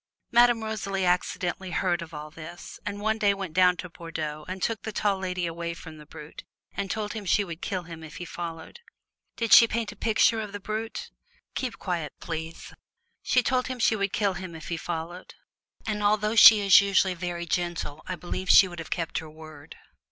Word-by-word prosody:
Madame 240 -1 +5
Rosalie 200 -3 -2
accidentally 180 +1 -1
heard 175 0 0
of 170 +1 -8
all 150 -1 -8
this, 165 +2 -10
and 205 0 -4
one 220 +1 0
day 200 -2 +3
went 190 -5 -6
down 180 0 +4
to 180 - -6
Bordeaux 160 -3 -6
and 185 +1 -5
took 225 -4 -1
the 220 - -5
Tall 200 -1 0
Lady 180 -1 -2
away 170 0 -4
from 160 -2 -11
the 150 - -14
Brute 150 0 -11 0.3
and 200 -1 -3
told 210 +1 -3
him 220 -2 -5
she 200 +2 +2
would 170 -3 -8
kill 185 -2 -3
him 165 -1 -10
if 155 +1 -10
he 175 - -6
followed. 165 - -7 0.6
"Did 230 -2 +1
she 230 - +10
paint 225 -1 -2
a - - -13
picture 225 +1 +2
of 210 -2 -7
the 205 - -5
Brute?" 215 +2 -5 0.4
"Keep 245 -3 -3
quiet, 170 -6 -3
please!" 165 0 -6 0.5
She 250 - +2
told 255 +1 +1
him 255 - -4
she 230 -2 +3
would 200 -2 -1
kill 205 -2 +1
him 185 -3 -7
if 160 - -9
he 170 - -1
followed, 170 +2 -6 0.5
and 210 -1 -2
although 210 +1 +2
she 215 -1 +10
is 195 0 +7
usually 195 -1 +2
very 175 -1 -4
gentle 170 -3 -2
I 185 - -3
believe 180 +1 -5
she 190 - +8
would 175 -1 -9
have 165 - -7
kept 165 -2 -2
her 160 - -9
word. 155 -1 -12
185 Hz, 205 wpm, -27 LUFS, 165-210 Hz, 0.6 s, she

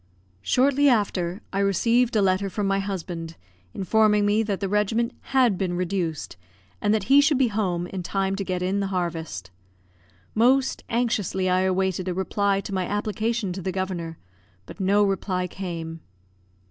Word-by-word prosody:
Shortly 280 - +3
after, 195 -5 0
I 195 - 0
received 230 +5 +2
a 210 - +4
letter 190 +1 +1
from 205 +2 -2
my 195 0 +1
husband, 175 -4 -5 0.4
informing 210 - +2
me 205 +2 +3
that 205 -3 -2
the 195 - -1
regiment 215 +4 0 0.2
had 245 -8 +4
been 180 -3 -1
reduced, 175 - -2 0.4
and 205 - +2
that 215 -2 +2
he 275 +7 +6
should 290 -1 +3
be 255 -3 +3
home 185 -5 -1
in 185 +1 -5
time 195 +2 -1
to 200 - -2
get 185 -1 -2
in 190 +2 0
the 200 - -1
harvest. 165 - -4 0.8
Most 255 +4 +2
anxiously 215 -6 0
I 185 - +3
awaited 190 0 0
a 180 - -1
reply 195 +1 0
to 200 - -7
my 185 -2 -1
application 215 0 -1
to 190 - -6
the 185 - -2
Governor; 180 -3 -4 0.5
but - - -12
no 200 +2 +3
reply 190 -2 0
came. 165 -3 -6
195 Hz, 165 wpm, -25 LUFS, 180-215 Hz, 0.8 s, he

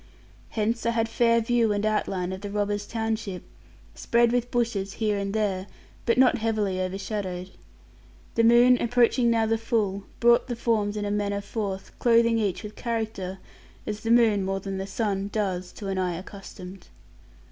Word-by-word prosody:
Hence 225 +2 0
I - - +4
had 230 -1 +1
fair 230 0 +3
view 230 -1 +2
and 205 0 0
outline 190 -4 -1
of 190 - -7
the 205 - -5
robbers' 205 0 -2
township, 220 -5 -3 0.5
spread 235 0 +2
with 245 0 0
bushes 225 -6 -1
here 215 -2 0
and 200 0 -2
there, 200 -3 -1 0.4
but 230 - +3
not 255 -2 +5
heavily 210 -4 0
overshadowed. 190 -1 -4 0.8
The 230 - +2
moon, 240 +2 +6
approaching 240 0 +3
now 225 -1 +3
the 225 0 0
full, 205 -4 -1
brought 235 +1 +4
the 245 - -3
forms 215 -3 0
in 205 - -2
manner 200 -1 -1
forth, 200 -2 -4
clothing 230 -1 +4
each 205 -1 -1
with 210 0 -8
character, 220 -5 -3 0.5
as 210 0 -4
the 225 - -4
moon 225 -4 +4
(more 195 0 -1
than 195 0 -5
the 195 - -4
sun) 200 -1 -1
does, 185 -4 -2
to 200 - -7
an 190 -1 -1
eye 180 -2 0
accustomed. 185 -1 -10
210 Hz, 170 wpm, -26 LUFS, 195-230 Hz, 0.8 s, moon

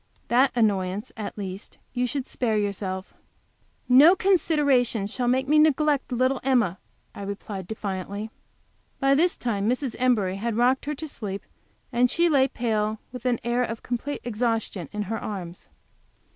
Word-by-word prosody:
That 260 +3 +4
annoyance, 200 -3 0
at 215 -2 -6
least, 195 -1 -7 0.2
you 250 0 0
should 270 +1 -3
spare 225 -6 -1
yourself." 195 -2 -3 0.7
"No 280 +9 +8
consideration 285 - +2
shall 245 +4 -2
make 260 +2 +2
me 305 +2 +5
neglect 300 -2 +3
little 255 +2 +1
Emma," 235 -9 +2 0.3
I - - -9
replied, 200 -1 -6
defiantly. 200 0 -4 0.7
By 275 -1 +4
this 340 +6 +2
time 210 -3 -1
Mrs. 250 0 -1
Embury 215 -7 +2
had 225 +2 -2
rocked 250 +3 +2
her 300 +1 -2
to 315 +3 -6
sleep, 200 -8 -5 0.5
and 245 +1 +3
she 340 +5 +3
lay, 270 -4 +4
pale 225 -5 0
and 215 +1 -4
with 250 0 -5
an 240 -2 +1
air 240 +1 +1
of 230 -2 -5
complete 250 +4 -3
exhaustion, 225 - -2
in 210 0 -3
her 220 +2 -3
arms. 180 -4 -7
235 Hz, 160 wpm, -25 LUFS, 205-265 Hz, 0.7 s, No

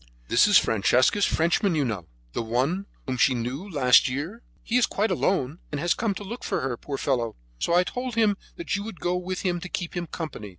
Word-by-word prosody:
"This 120 - +5
is 205 - +7
Francesca's 125 - +3
Frenchman, 170 +3 +2
you 145 -3 +1
know, 100 -8 -3 0.3
the - - -1
one 130 - -1 0.2
whom 130 -1 -2
she 130 +2 +4
knew 130 - -4
last 130 -7 +5
year. 160 - -4 0.2
He 230 - -2
is 245 - +3
quite 215 +2 0
alone, 160 -4 0
and 145 - -2
has 175 +3 +2
come 220 -4 -1
to 205 - -6
look 230 +5 -7
for - - -1
her, 130 -2 -1
poor 140 +3 -5
fellow; 120 -6 -1 0.2
so 170 - +1
I 180 - +5
told 250 +4 -4
him 220 -3 +3 0.2
that 340 - -2
you 200 - -3
would 220 -5 -8
go 180 +1 0
with 180 0 -3
him 175 -2 0
to 180 - -7
keep 180 -1 -4
him 175 -1 -3
company." 150 - -6
170 Hz, 225 wpm, -26 LUFS, 130-200 Hz, 0.3 s, is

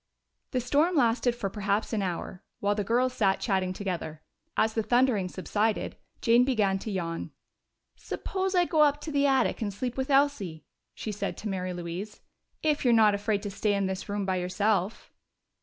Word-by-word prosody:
The 255 - 0
storm 290 +8 +2
lasted 240 -2 +2
for 235 -4 -2
perhaps 205 +2 -1
an 215 - +1
hour, 180 0 -4 0.2
while 205 0 +1
the 205 0 -1
girls 245 +5 +1
sat 195 -6 +2
chatting 190 -4 0
together. 175 -5 -4 0.3
As 220 0 +3
the 225 - +1
thundering 240 -5 +2
subsided, 210 +4 -1 0.3
Jane 235 +1 +5
began 210 -7 +1
to 220 - -6
yawn. 170 -3 -3 0.7
"Suppose 380 -2 -3
I 355 -1 +4
go 315 -3 +2
up 290 -1 +4
to 310 - -5
the 285 -1 +3
attic 265 -2 +2
and 210 -2 -1
sleep 245 +5 -4
with 265 +1 -2
Elsie?" 270 - +1 0.3
she 215 - -4
said 205 - -4
to 220 - -5
Mary 185 -1 -2
Louise, 175 +4 -6 0.4
"if 300 -2 +1
you're 245 -3 +5
not 215 -2 +6
afraid 205 0 -1
to 205 - -4
stay 205 +1 0
in 200 -1 0
this 190 +1 -4
room 205 -1 -1
by 190 -1 0
yourself." 190 +3 -1
210 Hz, 185 wpm, -28 LUFS, 190-250 Hz, 0.7 s, not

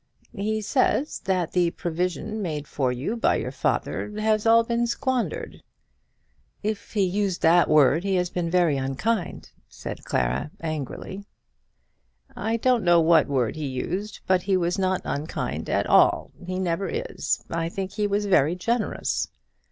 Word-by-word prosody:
"He 215 +1 -1
says 265 +5 +1
that 185 -3 0
the 175 -2 +2
provision 180 +6 -3
made 150 -6 -3
for 130 -3 0
you 130 - -2
by 230 - +2
your - - -3
father - - -1
has 215 0 +1
all 230 +1 +6
been 235 +1 0
squandered." 255 0 -2 1.0
"If 215 0 -3
he 205 -3 +2
used 190 0 -1
that 170 +2 +5
word 155 +2 +5
he 195 -1 0
has 180 -1 0
been 175 -2 -2
very 170 -5 +3
unkind," 165 +10 -2 0.2
said - - -7
Clara, 65 - -1
angrily. 160 +5 -5 1.1
"I 225 +1 -1
don't 245 -1 +2
know 175 -1 +5
what 165 0 +5
word 130 -5 0
he 155 -2 -3
used, 185 +11 -4
but 185 -1 +3
he 190 0 +1
was 180 +2 0
not 185 -1 +1
unkind 150 +3 -3
at - - +1
all; - - +4 0.2
he 185 0 -2
never 185 0 -1
is. 485 +2 -2
I 165 0 -1
think 190 +1 -4
he 210 -1 -1
was 205 +1 0
very 170 -4 +3
generous." 230 +5 -1
185 Hz, 155 wpm, -25 LUFS, 165-215 Hz, 1.1 s, all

